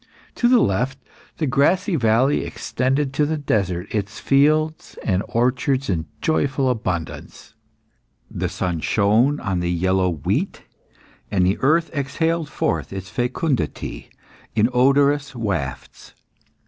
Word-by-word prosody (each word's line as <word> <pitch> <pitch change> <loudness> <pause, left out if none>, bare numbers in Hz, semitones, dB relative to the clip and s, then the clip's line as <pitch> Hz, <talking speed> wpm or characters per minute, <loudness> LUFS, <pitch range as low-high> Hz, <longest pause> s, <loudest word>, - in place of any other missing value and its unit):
To 240 - +2
the 245 -2 +5
left, 125 - 0 0.4
the 160 - 0
grassy 165 +8 +2
valley 120 +2 +2
extended 135 +2 -1
to 150 +1 +2
the 155 +1 -1
desert 95 -10 -1
its 105 0 -3
fields 155 +3 +2
and 95 -3 +1
orchards 130 +1 +1
in 80 -3 -2
joyful 135 -4 +1
abundance; 90 -8 -5 0.7
the - - -3
sun 90 -3 -2
shone 110 - +2
on 95 -3 -2
the 85 0 -1
yellow 95 +2 +1
wheat, 80 -5 -2 0.7
and 95 -3 +2
the 95 +2 +1
earth 160 +5 +2
exhaled 160 +3 -1
forth - - -2
its 95 -1 -7
fecundity 125 - -2 0.5
in 110 +1 +3
odorous 140 +2 +3
wafts. 95 - -4
125 Hz, 120 wpm, -22 LUFS, 95-145 Hz, 0.7 s, the